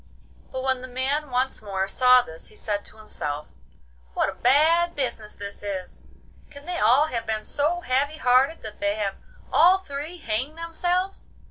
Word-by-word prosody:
But 260 0 -4
when 260 -1 0
the 255 - -7
man 270 +4 -1
once 255 0 -1
more 195 -2 -2
saw 250 +4 +5
this 160 -5 -10
he - - -13
said 205 -1 -2
to 220 - -12
himself, 150 - -5 0.6
'What - - +2
a - - -5
bad 325 +7 +3
business 235 -6 -3
this 200 0 -8
is! 195 -3 -6 0.4
Can 285 0 -12
they 355 0 -3
all 255 +7 +5
have 230 -4 -3
been 215 -1 -1
so 320 +5 0
heavy 285 +2 0
hearted 260 +4 +3
that 215 -1 -8
they 205 0 +1
have 200 -2 -2 0.4
all 360 +3 +7
three 310 -1 -6
hanged 265 +2 -2
themselves? 355 +3 -2
255 Hz, 170 wpm, -25 LUFS, 215-310 Hz, 0.6 s, all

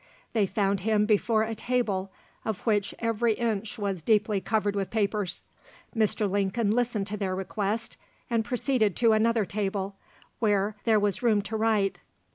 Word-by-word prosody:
They 215 -4 +2
found 195 0 0
him 210 +1 +2
before 215 +1 +2
a 225 +1 -3
table, 210 -5 -1 0.3
of 220 -4 -3
which 205 -3 +1
every 230 0 +1
inch 225 0 -2
was 200 -4 -2
deeply 210 +1 +2
covered 205 0 0
with 195 -1 -1
papers. 210 -3 -1 0.5
Mr. 215 -1 +1
Lincoln 200 +2 0
listened 235 -3 0
to 210 +1 -4
their 190 -2 -1
request, 205 +3 -2 0.3
and 230 -2 +1
proceeded 240 -3 +1
to 230 -2 +4
another 225 0 +2
table, 195 0 -3 0.4
where 205 -2 +1
there 220 -2 +4
was 205 -1 0
room 220 -4 +3
to 220 +2 -5
write. 215 -3 +1
210 Hz, 155 wpm, -27 LUFS, 200-225 Hz, 0.5 s, to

